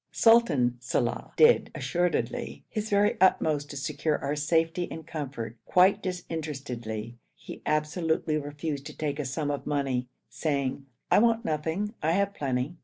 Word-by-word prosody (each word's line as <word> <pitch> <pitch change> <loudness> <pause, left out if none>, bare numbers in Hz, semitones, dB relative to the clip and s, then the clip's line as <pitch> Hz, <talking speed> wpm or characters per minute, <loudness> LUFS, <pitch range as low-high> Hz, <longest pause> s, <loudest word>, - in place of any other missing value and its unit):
Sultan 150 - +4
Salàh 125 - -2
did, 465 +1 +5
assuredly, 180 +7 -1
his 215 -1 -4
very 205 -1 +2
uttermost 150 -6 +3
to 145 - -6
secure 150 +2 -1
our 140 +1 -2
safety 165 +3 +1
and 160 -1 -7
comfort, 135 -8 -5
quite 185 +2 +4
disinterestedly. 135 - -5 0.2
He - - -10
absolutely 155 0 0
refused 145 0 -4
to - - -11
take 150 -1 -2
a 150 - -2
sum 145 +3 -2
of 145 - -4
money, 135 -4 0 0.2
saying, 140 +2 -2 0.2
'I - - +7
want 230 0 +3
nothing, 160 +7 -1
I 160 +2 +2
have 200 +1 +1
plenty.' 135 +1 -2
150 Hz, 145 wpm, -28 LUFS, 140-180 Hz, 0.2 s, I